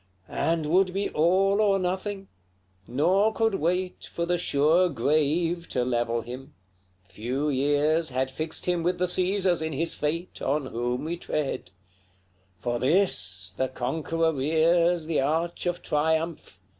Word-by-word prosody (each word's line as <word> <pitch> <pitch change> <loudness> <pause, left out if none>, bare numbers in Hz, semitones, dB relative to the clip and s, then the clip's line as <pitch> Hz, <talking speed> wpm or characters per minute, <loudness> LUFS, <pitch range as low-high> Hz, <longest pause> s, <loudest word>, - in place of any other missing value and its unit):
XCII. - - -12
And 165 -1 0
would 180 +4 +2
be 200 +1 0
all 190 +6 +3
or 200 -2 +3
nothing 190 +2 -3 0.6
nor 185 - +2
could 225 -1 +1
wait 180 +1 -1
For 170 - -2
the 175 0 0
sure 165 +4 +3
grave 155 +5 0
to 125 -1 0
level 120 -1 0
him; 130 +5 -9 0.5
few 125 +9 -2
years 145 +4 +2
Had 130 0 -1
fixed 155 +4 -4
him 175 -1 +1
with 175 +2 0
the 180 - +1
Caesars 185 -1 +1
in 160 0 -2
his 165 +4 0
fate, 165 +4 -3
On 140 +1 0
whom 125 +2 -3
we 170 +2 -3
tread: 150 - -3 0.9
For 120 0 -1
THIS 95 - +1
the 130 - 0
conqueror 160 +6 -1
rears 165 +4 +2
The 160 -3 0
arch 165 +5 -1
of 175 0 -2
triumph! 160 +2 -1
160 Hz, 145 wpm, -26 LUFS, 135-180 Hz, 0.9 s, all